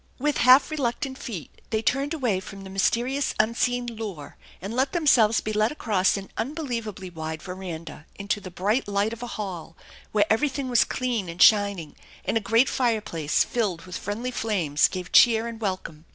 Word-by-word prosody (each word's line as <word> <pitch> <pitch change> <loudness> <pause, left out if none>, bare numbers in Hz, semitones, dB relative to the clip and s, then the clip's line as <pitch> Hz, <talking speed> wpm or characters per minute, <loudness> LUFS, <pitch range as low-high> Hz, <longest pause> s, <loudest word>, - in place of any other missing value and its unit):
With 295 +2 0
half 255 +4 +6
reluctant 265 -2 -2
feet 195 - -8
they 220 0 -1
turned 275 +4 0
away 250 - 0
from 195 +1 -10
the 190 - -9
mys 195 0 +3
terious 260 +4 -1
unseen 245 +3 +1
lure 215 -10 -7 0.2
and 195 +4 -6
let 265 +2 0
themselves 240 -10 +4
be 215 - -3
led 215 +2 +2
across 205 -10 +1
an 195 0 -8
un 260 +7 -3
believably 220 - -5
wide 160 -1 -5
veranda 175 -4 -7
into 200 +1 -2
the 185 - -8
bright 205 +8 0
light 205 +2 0
of 230 - -9
a 245 - -4
hall, 180 -6 -6 0.3
where 205 -1 +3
everything 270 +4 0
was 240 -2 +4
clean 240 -8 -2
and 170 +1 -8
shining, 200 -7 +3 0.3
and - - -1
a - - +4
great 225 +5 +3
fireplace 215 - 0
filled 200 -8 -2
with 180 -1 -8
friendly 225 +5 -4
flames 185 - +1
gave 180 -1 -6
cheer 230 -1 +6
and 230 -1 -8
welcome. 185 -6 -4
215 Hz, 180 wpm, -25 LUFS, 185-245 Hz, 0.3 s, half